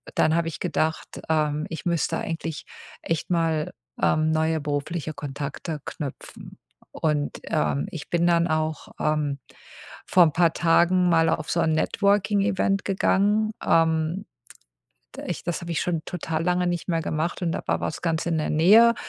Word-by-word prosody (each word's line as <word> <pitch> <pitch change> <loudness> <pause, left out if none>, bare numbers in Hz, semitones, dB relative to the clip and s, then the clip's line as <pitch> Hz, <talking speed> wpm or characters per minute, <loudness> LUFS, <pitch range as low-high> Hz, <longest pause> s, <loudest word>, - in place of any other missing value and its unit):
dann 155 - +3
habe 170 0 +1
ich 165 - -5
gedacht, 160 +1 -1 0.2
ähm, 155 -1 +1
ich 165 - -7
müsste 170 -2 0
eigentlich 165 -1 -4 0.4
echt 165 +2 -2
mal, 165 -3 0 0.3
ähm, 155 0 +2
neue 160 0 +1
berufliche 150 +2 -3
Kontakte 145 +2 -5
knüpfen. 140 -4 -8 0.3
Und, 150 -2 -1
ähm, 75 -1 0
ich 160 - -8
bin 170 0 +1
dann 170 0 +3
auch, 155 -1 -1
ähm, 150 -2 0 0.7
vor 180 - +5
'n 160 - +3
paar 165 +1 +3
Tagen 175 +2 +3
mal 165 -1 +4
auf 155 -1 -1
so 170 - +1
'n 160 -1 +2
Networking-Event 200 +2 +1
gegangen, 205 +2 +2
ähm. 165 +3 +2 0.9
D - - -8
ich - - -4
das 175 - -3
habe 170 0 -5
ich 165 - 0
schon 170 -3 -1
total 160 -2 -3
lange 180 +1 +1
nicht 175 +1 -3
mehr 165 -1 +1
gemacht 160 +4 -2
und 170 -2 0
da - - -3
war - - +1
was - - -4
ganz 165 -1 -1
in 170 -1 0
der 155 - -1
Nähe 215 +9 +6
165 Hz, 165 wpm, -25 LUFS, 155-175 Hz, 0.9 s, Nähe